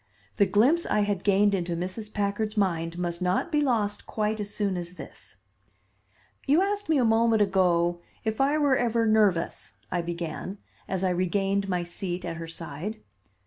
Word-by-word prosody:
The 200 - +4
glimpse 275 +12 +3
I 210 - +2
had 205 -2 -1
gained 200 0 +4
into 175 -3 -1
Mrs. 185 +5 -4
Packard's 210 +2 -2
mind 170 -4 0
must 175 0 -2
not 180 - 0
be 300 -1 +2
lost 220 -7 0
quite 215 0 -1
as 205 0 -4
soon 200 -3 -1
as 175 0 -5
this. 160 - -11 1.1
"You 305 +7 +4
asked 410 -2 -2
me 315 - +4
a 250 - +3
moment 225 -1 +4
ago 175 -3 +2 0.2
if 220 +2 -1
I 285 +3 +3
were 285 -3 +3
ever 235 -2 +1
nervous," 210 -6 +1 0.2
I 175 - 0
began, 170 +3 -5 0.3
as 190 -1 -2
I 185 - +2
regained 195 +2 0
my 180 -2 0
seat 175 +1 -4
at 165 - -4
her 165 0 -6
side. 165 +6 -6
200 Hz, 175 wpm, -27 LUFS, 175-220 Hz, 1.1 s, The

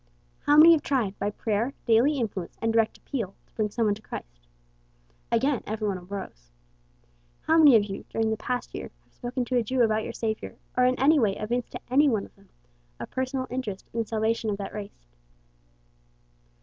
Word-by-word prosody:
"How 290 +1 +6
many 320 +2 +10
have 325 -3 +5
tried, 235 -8 -1
by 200 - 0
prayer, 220 +5 -2
daily 245 +6 +4
influence, 205 -8 -4
and 225 0 0
direct 225 -1 +2
appeal, 225 -9 -4
to - - -35
bring 215 -1 -1
some 230 +2 0
one 210 - +3
to 210 - -9
Christ?" - - -9 0.8
Again 255 +2 +2
every 215 0 -2
one 190 -2 -2
arose. 175 - -8 0.9
"How 320 - +2
many 290 -6 +8
of 215 - +5
you, 195 -1 -7
during 225 0 0
the - - +1
past 250 +3 -3
year, - - -6
have - - -35
spoken 245 0 -3
to 250 +1 0
a 240 - +2
Jew 250 +2 +1
about 220 -1 +2
your - - -5
Savior, 220 -1 -3 0.2
or 250 - +4
in 255 0 +2
any 295 +4 +5
way 205 -5 +2
evinced 240 +3 -3
to - - -5
any 285 +3 +5
one 220 -5 0
of - - -19
them - - -24 0.5
a - - -4
personal 260 0 -2
interest 220 -7 -5
in 230 - -2
the 225 - -1
salvation 220 0 0
of 200 - -1
that 200 - -6
race?" 200 - -8
225 Hz, 200 wpm, -26 LUFS, 210-255 Hz, 0.9 s, many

